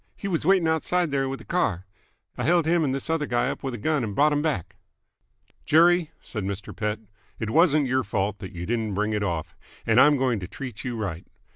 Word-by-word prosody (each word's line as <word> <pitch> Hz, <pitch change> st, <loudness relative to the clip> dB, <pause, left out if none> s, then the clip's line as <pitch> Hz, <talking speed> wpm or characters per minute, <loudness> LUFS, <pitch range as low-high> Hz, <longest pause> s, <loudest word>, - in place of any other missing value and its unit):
He 200 Hz, -, -6 dB
w's 170 Hz, -4 st, -1 dB
waiting 190 Hz, -4 st, +4 dB
outside 160 Hz, +1 st, +1 dB
there 135 Hz, -1 st, 0 dB
with 135 Hz, -, -5 dB
a -, -, -14 dB
car. 100 Hz, -, 0 dB, 0.5 s
I -, -, -4 dB
held 170 Hz, -1 st, +3 dB
h'm 170 Hz, 0 st, +2 dB
and 140 Hz, -, 0 dB
this 135 Hz, 0 st, -3 dB
other 160 Hz, -3 st, 0 dB
guy 120 Hz, -1 st, +1 dB
up -, -, -6 dB
w'th 130 Hz, -2 st, -3 dB
a -, -, -5 dB
gun 150 Hz, +4 st, 0 dB
and 105 Hz, -3 st, -4 dB
brought 150 Hz, +2 st, +4 dB
'em 145 Hz, 0 st, +1 dB
back!" 150 Hz, -, -2 dB, 0.9 s
"Jerry," 170 Hz, +1 st, +4 dB
said 105 Hz, -4 st, -5 dB
Mr. 100 Hz, 0 st, -5 dB
Pett, 105 Hz, +1 st, -2 dB, 0.4 s
"it 110 Hz, -1 st, -3 dB
wasn't 155 Hz, -2 st, +4 dB
your 130 Hz, 0 st, +1 dB
fault 100 Hz, -1 st, -2 dB
that 95 Hz, -3 st, -8 dB
you 85 Hz, 0 st, -6 dB
didn't 110 Hz, -2 st, -1 dB
bring 105 Hz, +2 st, 0 dB
it 105 Hz, -, -1 dB
off, 85 Hz, -6 st, -3 dB, 0.3 s
and 115 Hz, +2 st, +5 dB
I'm 145 Hz, 0 st, +6 dB
going 130 Hz, -4 st, +1 dB
to 90 Hz, -, -6 dB
treat 125 Hz, -1 st, -8 dB
you 125 Hz, -2 st, -3 dB
right. 90 Hz, -6 st, -4 dB
130 Hz, 230 wpm, -25 LUFS, 105-155 Hz, 0.9 s, I'm